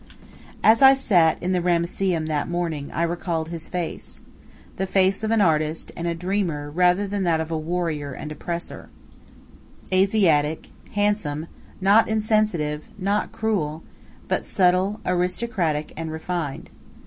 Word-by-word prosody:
As 225 +3 +6
I 270 0 +9
sat 175 -11 +3
in 180 - 0
the 180 -1 +1
Ramesseum 175 0 0
that 155 -1 -2
morning, 165 -5 -3
I 170 - -1
recalled 170 -1 -2
his 165 -1 -6
face 175 -2 -5 0.6
the 190 - -1
face 190 +2 +2
of 220 - 0
an 225 -1 +3
artist 155 -3 +1
and 170 - -3
a 170 - -1
dreamer 170 -5 -2
rather 180 +4 +3
than 200 0 -3
that 165 -2 +2
of 160 0 -4
a 160 - 0
warrior 155 -3 -2
and 150 +4 -7
oppressor; 170 +3 -6 1.0
Asiatic, 185 -6 +2 0.2
handsome, 205 -8 0 0.3
not 200 +3 +5
insensitive, 215 -9 0
not 200 +2 -1
cruel, 165 -8 -2 0.4
but - - 0
subtle, 185 +2 +2
aristocratic, 180 -3 -1
and 160 0 -5
refined. 160 -3 -4
175 Hz, 135 wpm, -23 LUFS, 160-195 Hz, 1.0 s, I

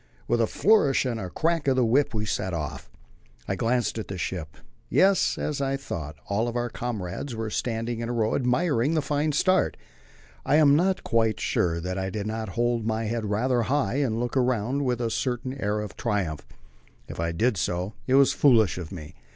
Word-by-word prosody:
With 120 0 +2
a 115 - +3
flourish 185 - +3
and 120 -3 -2
a 95 -4 -5
crack 165 - 0
of 135 - +4
the 130 -2 +3
whip 135 +6 +3
we 110 -3 -2
set 95 -3 -2
off. 75 -4 -5 0.6
I - - 0
glanced 115 +2 0
at 110 - -5
the 95 - -5
ship. 85 -4 -4 0.3
Yes; 195 0 +3
as 145 -2 -2
I 135 0 0
thought 80 - -6
all 105 +4 0
our 120 0 -2
comrades 115 +1 -4
were 110 -1 -4
standing 115 0 -2
in 115 0 -3
a - - -1
row, 110 -2 0
admiring 135 +2 +1
the 155 - +1
fine 150 +1 0
start. 185 +6 +2 0.7
I 140 - +2
am 150 -2 +6
not 185 +4 +1
quite 110 -2 +1
sure 85 -1 0
that 90 +2 -3
I 95 0 -2
did 100 +1 -4
not 110 0 -3
hold 120 -1 +1
my 110 0 -1
head 115 0 -2
rather 120 +4 +1
high 130 -1 0
and 120 -6 0
look 120 +1 -2
round 130 +2 +1
with 125 -1 0
a 115 -1 -1
certain 125 +1 -2
air 105 +1 0
of 105 - -7
triumph. 95 -10 -2 0.6
If - - -8
I 85 0 0
did 115 +8 +1
so, 90 +3 -2
it 130 - +3
was 140 0 +5
foolish 110 - +4
of 85 -1 -7
me. 85 -2 -8
115 Hz, 200 wpm, -26 LUFS, 105-135 Hz, 0.7 s, am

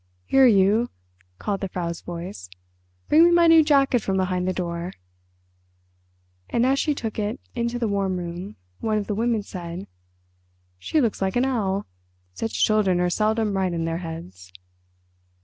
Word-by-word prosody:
"Here 270 -1 +5
you!" 215 +2 +4 0.5
called 200 - -2
the 195 - -1
Frau's 170 -2 -4
voice, 170 - -7 0.6
"bring 315 +2 +6
me 345 - +6
my 345 0 +5
new 325 -1 +7
jacket 275 -5 +3
from 195 -1 -1
behind 185 -1 0
the - - +2
door." 175 -1 -4 1.6
And 235 +1 +1
as 270 +1 +2
she 300 -2 +1
took 225 -4 -4
it 215 +4 -2
into 235 0 -2
the 235 -2 -1
warm 195 -2 0
room 175 +3 -6 0.2
one 215 -1 0
of 205 - -2
the 210 - -2
women 225 0 0
said, 175 -2 -7 0.9
"She 310 - 0
looks 230 -8 0
like 190 -1 0
an 245 +2 +3
owl. 205 -7 -1 0.5
Such 225 - 0
children 205 -4 +2
are 180 0 +1
seldom 215 0 +1
right 190 -1 0
in 165 -1 -2
their 165 0 -2
heads." 95 - -9
200 Hz, 165 wpm, -24 LUFS, 180-235 Hz, 1.6 s, new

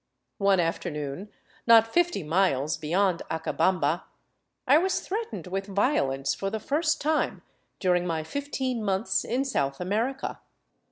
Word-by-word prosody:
One 195 -1 +4
afternoon, 165 +1 -3 0.4
not 225 -1 +8
fifty 350 - +2
miles 155 -3 +1
beyond 170 +3 +1
Acabamba, 160 0 0 0.6
I 285 +4 +6
was 375 +2 +1
threatened 440 - -4
with 195 +2 -3
violence 185 - +1
for 195 - -3
the 220 - -3
first 315 +7 0
time 310 +1 0 0.4
during 180 -1 +2
my 160 -2 -1
fifteen 260 - -3
months 190 -1 0
in 255 +4 -1
South 140 - -1
America. 225 +9 -2
195 Hz, 125 wpm, -27 LUFS, 165-265 Hz, 0.6 s, not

